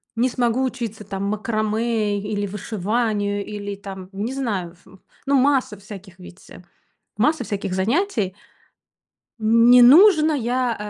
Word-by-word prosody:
не 240 +3 +1
смогу 245 0 0
учиться 235 -5 -4
там 195 0 -5
макраме 215 0 -1
или 205 0 -3
вышиванию, 205 0 -2
или 205 -1 -6
там 195 -2 -9
не 210 +6 -4
знаю 200 -10 -3
ф 180 - -27 0.4
ну 280 0 +2
масса 265 -5 +1
всяких 195 -2 -12
ведь, 180 0 -14
э. - - -13 0.5
Масса 295 +5 +1
всяких 200 -4 -4
занятий. 215 - -1 1.1
Не 230 +3 +5
нужно, 315 - +6
я, 250 -2 -1
215 Hz, 125 wpm, -21 LUFS, 200-245 Hz, 1.1 s, нужно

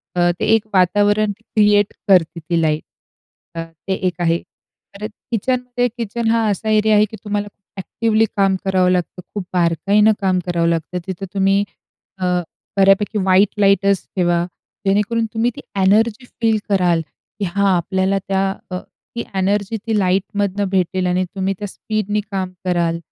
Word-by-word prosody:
अ, 175 0 +3
ते - - 0
एक 220 -1 -1
वातावरण 205 +3 +3
क्रिएट 210 -2 +2
करते 175 -3 +3
ती 165 +1 -1
लाईट. 155 -1 +1 0.7
अ, 165 - -3 0.2
ते 190 - +1
एक 180 -2 -2
आहे. 170 0 +2 0.6
तर - - -3 0.3
किचन 250 +3 0 0.2
ते 245 0 +3
किचन 230 0 -2
हा 230 -1 +2
असा 210 +2 -2
एरिया 215 0 +4
आहे 210 0 +5
की 220 - -8
तुम्हाला 205 -1 -2
खूप 200 -1 -22
ॲक्टिवली 220 +3 +1
काम 195 -1 +3
करावं 185 -1 +3
लागतं, 180 0 -1
खूप 205 - -2
बारकाईनं 195 +5 +3
काम 185 -2 +2
करावं 170 -2 0
लागतं, 165 +2 -2
तिथं 190 +1 -4
तुम्ही 195 0 +3 0.6
अ, 185 - -3 0.5
बऱ्यापैकी 195 +2 +3
व्हाइट 190 +1 +4
लाईटच 200 -1 +3
ठेवा, 175 -2 +2 0.4
जेणेकरून 210 +4 +2
तुम्ही 225 +2 +1
ती - - -7 0.2
एनर्जी 215 +5 +3 0.2
फील 225 -2 +3
कराल 180 -4 +2 0.4
की - - 0
हां 200 0 +2
आपल्याला 190 +3 0
त्या, 195 0 +1 0.2
अ, 180 - -2 0.4
ती 235 - -2
एनर्जी 200 +3 0
ती 220 -2 +1
लाईटमधनं 200 +1 0
भेटेल 185 -1 0
आणि 180 +1 +1
तुम्ही 190 +1 -2
त्या 205 - -4
स्पीडने 210 +1 -2
काम 190 -2 -2
कराल, 170 -2 0
195 Hz, 160 wpm, -19 LUFS, 185-210 Hz, 0.7 s, आहे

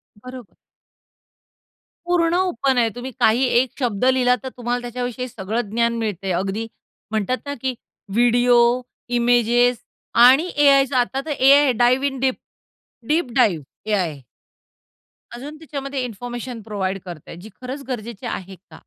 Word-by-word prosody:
बरोबर. 250 0 -11 1.5
पूर्ण 345 -1 +2
ओपन 275 -8 +1
आहे. 230 -2 +3
तुम्ही 250 +2 -6
काही 235 +4 +4 0.2
एक 255 - 0
शब्द 235 -3 0
लिहिला 255 -1 +4
तर 260 - -4
तुम्हाला 245 0 -2
त्याच्याविषयी 245 +1 -4
सगळं 220 0 -3
ज्ञान 235 +2 +1
मिळतंय 200 -4 -3
अगदी, 195 +5 -2 0.4
म्हणतात 220 +4 0
ना 285 - -3
की 260 -1 -1 0.4
व्हिडिओ, 245 +1 +4 0.6
इमेजेस 240 0 +3 0.5
आणि 275 +8 +5
एआयचा 275 -2 +4
आता 260 +2 -1
तर 315 - -4
एआय 280 +2 +6
आहे 275 - +3
dive 255 +3 +3
in 270 -1 -5
deep, 260 0 +1 0.7
deep 305 -5 0
dive 195 - +3 0.3
AI. 175 -8 0 1.2
अजून 290 +5 -8
त्याच्यामध्ये 275 -3 -5
इन्फॉर्मेशन 240 +1 -6
प्रोव्हाईड 195 -3 -3
करताय 170 -3 -9
जी 215 - -11
खरंच 260 +3 -6
गरजेची 235 -4 -6
आहे 190 0 -5
का? - - -13
245 Hz, 135 wpm, -21 LUFS, 220-265 Hz, 1.5 s, एआय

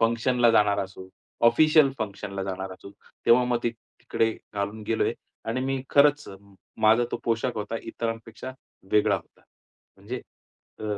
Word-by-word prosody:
फंक्शनला 115 +1 +3
जाणार 105 -2 +4
असो, 95 0 -11 0.4
ऑफिशियल 155 +3 +5
फंक्शनला 100 -2 -4
जाणार 95 0 -4
असू, 95 +1 -12 0.4
तेव्हा 120 +2 +6
मग 125 -1 +1
ते 120 - +2
तिकडे 115 0 -2 0.2
घालून 100 +2 -3
गेलोय 115 - +1 0.4
आणि 125 +3 -1
मी 135 -1 -1
खरंच 145 +1 +4
अ, 95 - -9 0.4
माझा 110 +3 +5
तो - - +1
पोशाख 115 +2 0
होता 110 +2 -3
इतरांपेक्षा 115 +1 -5 0.4
वेगळा 105 -1 +4
होता. - - -15 0.5
म्हणजे, 105 +6 -6 0.6
अ, - - -10
115 Hz, 140 wpm, -26 LUFS, 105-125 Hz, 0.6 s, तेव्हा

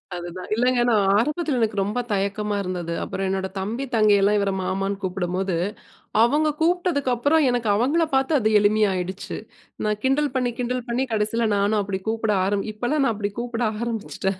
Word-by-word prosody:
அதுதான். 175 +1 -7
இல்லைங்க, 245 +1 +2
நான் 210 -4 +3
ஆரம்பத்தில 300 +3 0
எனக்கு 215 -2 0
ரொம்ப 210 +5 -2
தயக்கமா 205 +1 -1
இருந்தது. 175 -2 -3
அப்பறம் 195 0 -3
என்னோட 190 0 -1
தம்பி, 215 +7 -3
தங்கையெல்லாம் 205 -1 +4
இவரை 200 -1 0
மாமான்னு 195 +2 -2
கூப்பிடும்போது, 185 0 -2 0.7
அவங்க 295 +6 +3
கூப்பிட்டதுக்கப்பறம் 310 -4 +2
எனக்கு 240 -3 0
அவங்கள்ல 285 +10 +2
பார்த்து 265 +4 +2
அது 220 -2 +1
எளிமையா 210 0 +3
ஆயிடுச்சு. 185 +1 -4 0.5
நான் 210 0 0
கிண்டல் 275 +2 +2
பண்ணி, 250 -2 +1
கிண்டல் 250 0 -2
பண்ணி 250 +3 0
கடைசியில 220 +2 +1
நானும் 205 +1 +2
அப்படி 195 -1 -3
கூப்பிட 220 -1 0
ஆரம்பி 200 +1 -1
இப்பல்லாம் 250 +7 0
நான் 230 - +2
அப்படி 205 -1 -3
கூப்பிட 240 0 -3 0.2
ஆரம்பிச்சுட்டேன். 210 -4 -3
215 Hz, 160 wpm, -23 LUFS, 195-250 Hz, 0.7 s, தங்கையெல்லாம்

